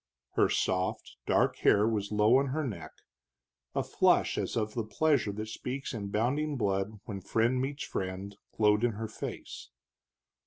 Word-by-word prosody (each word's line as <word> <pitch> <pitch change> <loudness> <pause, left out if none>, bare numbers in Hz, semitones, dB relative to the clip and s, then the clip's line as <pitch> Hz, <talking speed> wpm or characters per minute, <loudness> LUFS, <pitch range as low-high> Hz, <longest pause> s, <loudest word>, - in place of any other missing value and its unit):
Her - - +3
soft 90 0 -1
dark - - +3
hair 105 +1 +4
was 105 -3 -1
low 105 +4 +5
on 140 +1 +2
her 155 +4 -1
neck, 85 - -5 0.9
a - - +1
flush - - +3
as - - -2
of 110 -1 -1
the 115 - -1
pleasure 125 +1 +1
that 110 +1 -5
speaks 130 +5 -5
in 105 -4 -4
bounding 135 +8 0
blood 100 -1 -1
when 100 -3 -5
friend 115 +6 +1
meets 140 +2 -3
friend 95 +2 -4 0.2
glowed 105 0 +3
in 120 -2 +2
her 110 +2 -4
face. 110 - -7
110 Hz, 160 wpm, -30 LUFS, 100-125 Hz, 0.9 s, low